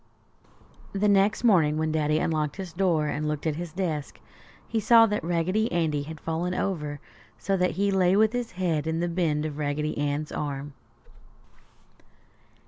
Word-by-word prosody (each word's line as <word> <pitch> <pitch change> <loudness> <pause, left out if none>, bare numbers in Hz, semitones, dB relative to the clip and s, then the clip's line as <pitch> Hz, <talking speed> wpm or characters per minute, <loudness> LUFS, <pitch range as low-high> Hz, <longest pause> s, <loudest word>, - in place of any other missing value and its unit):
The 200 +1 +1
next 200 +2 +3
morning, 165 -10 +4
when 155 0 0
Daddy 155 -1 +1
unlocked 155 -2 -1
his 190 -4 -7
door 170 -4 +1
and 150 +1 -2
looked 150 0 -3
at 155 -2 0
his 175 -1 -5
desk, 160 -5 -3 0.5
he 225 - -1
saw 225 +2 +6
that 210 -4 -2
Raggedy 175 +6 0
Andy 160 -4 0
had 155 +2 -8
fallen 170 +4 -2
over 150 -7 -2 0.4
so 195 - -1
that 180 0 +1
he 200 +1 +2
lay 185 -1 +3
with 215 +2 +3
his 245 -3 -3
head 165 -4 -1
in 160 0 -1
the 175 - 0
bend 165 -4 0
of 150 -1 -5
Raggedy 150 +1 -1
Ann's 145 +1 -2
arm. 145 -1 -4
165 Hz, 165 wpm, -26 LUFS, 150-190 Hz, 0.5 s, saw